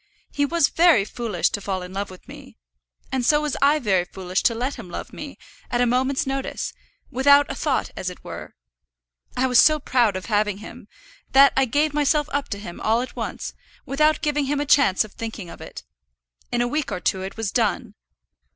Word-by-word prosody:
He 285 Hz, 0 st, 0 dB
was 335 Hz, -2 st, +2 dB
very 330 Hz, -, +4 dB
foolish 215 Hz, -6 st, -1 dB
to 205 Hz, -, -3 dB
fall 190 Hz, -2 st, -3 dB
in 180 Hz, +1 st, -9 dB
love 200 Hz, +1 st, -3 dB
with 185 Hz, -1 st, -14 dB
me. -, -, -13 dB, 0.5 s
And 260 Hz, -2 st, -1 dB
so 295 Hz, +5 st, +4 dB
was 300 Hz, -2 st, -2 dB
I 285 Hz, +2 st, +5 dB
very 200 Hz, -10 st, +1 dB
foolish 185 Hz, 0 st, -3 dB
to 230 Hz, -, +2 dB
let 255 Hz, +5 st, -2 dB
him 225 Hz, -8 st, -10 dB
love -, -, -7 dB
me, -, -, -8 dB, 0.3 s
at 240 Hz, -, 0 dB
a 245 Hz, -, +4 dB
moment's 260 Hz, +5 st, +1 dB
notice, 270 Hz, 0 st, -3 dB, 0.4 s
without 280 Hz, +3 st, +5 dB
a -, -, -4 dB
thought 275 Hz, -1 st, -1 dB
as 185 Hz, -, -3 dB
it 180 Hz, -, -12 dB
were. -, -, -9 dB, 0.8 s
I 255 Hz, -, +2 dB
was 250 Hz, -3 st, +4 dB
so 310 Hz, -1 st, +6 dB
proud 245 Hz, -7 st, +2 dB
of 185 Hz, -, -5 dB
having 210 Hz, -2 st, 0 dB
him, 215 Hz, -, -11 dB, 0.5 s
that 275 Hz, +1 st, +7 dB
I 270 Hz, -, +3 dB
gave 290 Hz, +5 st, +1 dB
myself 295 Hz, 0 st, +2 dB
up 285 Hz, 0 st, -1 dB
to 200 Hz, -, -3 dB
him 190 Hz, -4 st, -9 dB
all 225 Hz, +2 st, +2 dB
at 255 Hz, -, -7 dB
once, -, -, -5 dB, 0.3 s
without 305 Hz, +3 st, +2 dB
giving 295 Hz, -1 st, +1 dB
him 285 Hz, +1 st, -1 dB
a 290 Hz, -, -1 dB
chance 280 Hz, -10 st, +4 dB
of 215 Hz, -, -12 dB
thinking 220 Hz, -6 st, -7 dB
of -, -, -12 dB
it. -, -, -9 dB, 0.7 s
In 240 Hz, -, +1 dB
a -, -, 0 dB
week 295 Hz, +3 st, -2 dB
or -, -, -2 dB
two 185 Hz, +1 st, -1 dB
it 190 Hz, +2 st, -7 dB
was 225 Hz, -3 st, -2 dB
done. 225 Hz, -1 st, 0 dB
245 Hz, 210 wpm, -23 LUFS, 205-285 Hz, 0.8 s, that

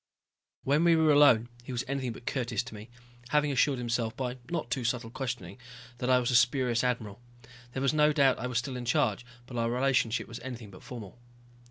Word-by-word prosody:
When 145 Hz, +4 st, +2 dB
we 170 Hz, -1 st, +5 dB
were 160 Hz, -1 st, +4 dB
alone 140 Hz, -6 st, +6 dB, 0.2 s
he 125 Hz, -, -8 dB
was 125 Hz, 0 st, -2 dB
anything 130 Hz, -3 st, -2 dB
but 120 Hz, -, -13 dB
courteous 120 Hz, -4 st, -1 dB
to 125 Hz, -, -10 dB
me, 105 Hz, +2 st, -10 dB, 0.4 s
having 150 Hz, +1 st, +2 dB
assured 135 Hz, 0 st, +2 dB
himself 115 Hz, -2 st, -2 dB
by 125 Hz, -1 st, -3 dB
not 160 Hz, -9 st, -3 dB
too 125 Hz, 0 st, -1 dB
subtle 115 Hz, -1 st, -2 dB
questioning 115 Hz, -7 st, -5 dB, 0.4 s
that 125 Hz, -, -1 dB
I 130 Hz, -, +6 dB
was 125 Hz, 0 st, 0 dB
a -, -, +2 dB
spurious 125 Hz, -1 st, +3 dB
admiral. 115 Hz, -4 st, -2 dB, 0.5 s
There 135 Hz, -, -2 dB
was 140 Hz, -, +2 dB
no 150 Hz, 0 st, +4 dB
doubt 140 Hz, -3 st, +3 dB
I -, -, -3 dB
was 125 Hz, -2 st, -2 dB
still 125 Hz, +2 st, -2 dB
in 125 Hz, -, -6 dB
charge, 120 Hz, -3 st, +1 dB, 0.2 s
but 125 Hz, -1 st, -8 dB
our 115 Hz, 0 st, +1 dB
relationship 125 Hz, -2 st, +1 dB
was 115 Hz, -, -8 dB
anything 120 Hz, -4 st, -8 dB
but 90 Hz, -, -13 dB
formal. 115 Hz, -3 st, -9 dB
125 Hz, 210 wpm, -29 LUFS, 115-135 Hz, 0.5 s, alone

